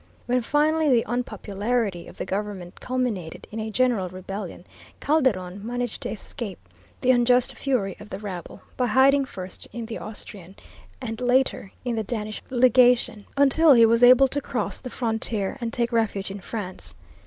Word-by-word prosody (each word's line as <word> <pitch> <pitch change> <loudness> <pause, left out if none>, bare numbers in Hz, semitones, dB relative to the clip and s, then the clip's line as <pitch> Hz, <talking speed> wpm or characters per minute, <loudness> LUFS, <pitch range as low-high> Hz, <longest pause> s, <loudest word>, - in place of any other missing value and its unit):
When 250 +1 +1
finally 300 +4 +2
the 240 -3 +4
unpopularity 215 -3 -2
of - - -13
the - - -4
government 195 -3 -4
culminated 245 -10 -3
in 220 - -5
a 220 0 -3
general 225 -5 +1
rebellion, 185 0 -7 0.3
Calderon 205 - +1
managed 245 0 -3
to - - -3
escape 210 -1 -6 0.4
the 255 - +4
unjust 245 0 +3
fury 240 -9 -1
of 210 - -11
the 190 - -5
rabble 190 -4 -7
by 250 - +1
hiding 270 +4 +4
first 185 -6 -6
in 235 -1 -5
the 225 0 -6
Austrian, 200 -3 -9 0.5
and 225 +2 -5
later 250 -5 +1
in 240 -2 -1
the 220 - 0
Danish 215 -1 -4
Legation, 245 -3 +4
until 285 +2 +6
he 230 -2 +7
was 230 +1 +3
able 255 +2 +8
to 285 +2 -2
cross 250 - -3
the 255 - -6
frontier 225 -4 -2
and 230 -1 -2
take 235 0 -1
refuge 205 -4 0
in 200 - -6
France. 185 -1 -6
230 Hz, 165 wpm, -25 LUFS, 200-250 Hz, 0.5 s, able